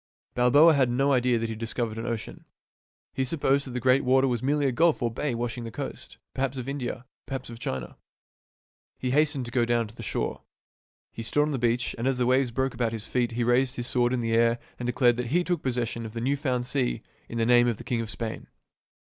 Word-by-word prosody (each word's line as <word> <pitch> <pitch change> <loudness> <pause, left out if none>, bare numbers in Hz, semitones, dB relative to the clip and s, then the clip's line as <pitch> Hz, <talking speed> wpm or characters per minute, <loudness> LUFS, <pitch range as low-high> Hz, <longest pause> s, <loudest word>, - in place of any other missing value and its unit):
Balboa 145 +7 +6
had 135 -4 +3
no 135 +4 +2
idea 125 -1 +3
that 115 - -1
he 115 - -3
had 110 - -6
discovered 115 -1 -3
an 115 - -4
ocean. 115 -2 -5 0.7
He 135 - 0
supposed 140 -1 +1
that - - -6
the 125 - -1
great 130 +2 +3
water 130 +1 +4
was 120 -3 -1
merely 145 +2 +1
a 135 - +2
gulf 160 +1 +2
or 120 - +1
bay 125 +2 -2
washing 120 0 -3
the 115 - -5
coast, 115 - -7 0.2
perhaps 135 0 -2
of 125 0 -5
India, 130 -2 -4 0.2
perhaps 135 -3 -5
of 115 - -9
China. 65 - -4 1.0
He 125 - -2
hastened 145 -2 +2
to 120 - -7
get 120 -2 +1
down 120 -1 +2
to 110 - -16
the 115 - -9
shore. 115 - -3 0.7
He - - -7
stood 145 +6 +1
on 150 - -1
the 135 - -2
beach, 120 +1 +1
and 120 - 0
as 135 -1 +1
the 125 - +1
waves 130 +1 +3
broke 130 +3 -1
about 115 -1 -1
his 110 -1 -5
feet 120 -1 -1
he 120 +1 0
raised 125 +2 +2
his 120 - -3
sword 120 -1 +1
in 125 -1 0
the 115 -1 -1
air 115 +1 +3 0.2
and 120 - -3
declared 120 -1 +3
that 125 -1 -2
he 175 +8 +2
took 175 -1 -1
possession 120 -2 -2
of 110 -1 -7
the 115 - -4
new 135 +4 +1
found 130 -3 -1
sea - - -1 0.3
in 115 - -5
the 115 - +2
name 120 0 +5
of 115 -3 0
the - - -9
king 120 -2 -1
of 115 - -5
Spain. 115 0 -5
125 Hz, 245 wpm, -27 LUFS, 115-135 Hz, 1.0 s, Balboa